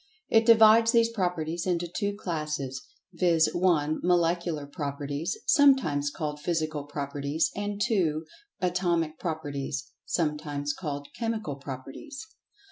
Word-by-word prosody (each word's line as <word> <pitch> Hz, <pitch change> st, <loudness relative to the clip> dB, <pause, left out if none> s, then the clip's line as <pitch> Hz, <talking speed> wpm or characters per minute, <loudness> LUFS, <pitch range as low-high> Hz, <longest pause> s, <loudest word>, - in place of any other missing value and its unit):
It 225 Hz, 0 st, +4 dB
divides 225 Hz, 0 st, +7 dB
these 230 Hz, -1 st, +4 dB
properties 175 Hz, -5 st, -2 dB
into 175 Hz, -1 st, 0 dB
two 200 Hz, +4 st, -2 dB
classes, 150 Hz, -8 st, -3 dB, 0.3 s
viz.: 165 Hz, -3 st, +3 dB
(1) 160 Hz, -4 st, +2 dB
Molecular 170 Hz, -3 st, +1 dB
Properties 145 Hz, -, -4 dB
(sometimes 265 Hz, -, +4 dB
called 150 Hz, 0 st, -4 dB
Physical 155 Hz, -2 st, -2 dB
Properties); 145 Hz, +1 st, -2 dB
and 205 Hz, 0 st, -3 dB
(2) 170 Hz, -7 st, +1 dB, 0.4 s
Atomic 175 Hz, -3 st, 0 dB
Properties 140 Hz, -4 st, -4 dB, 0.2 s
(sometimes 150 Hz, -3 st, -1 dB
called 145 Hz, -3 st, -5 dB
Chemical 220 Hz, -10 st, -2 dB
Properties). 140 Hz, -, -8 dB
160 Hz, 110 wpm, -28 LUFS, 145-185 Hz, 0.4 s, divides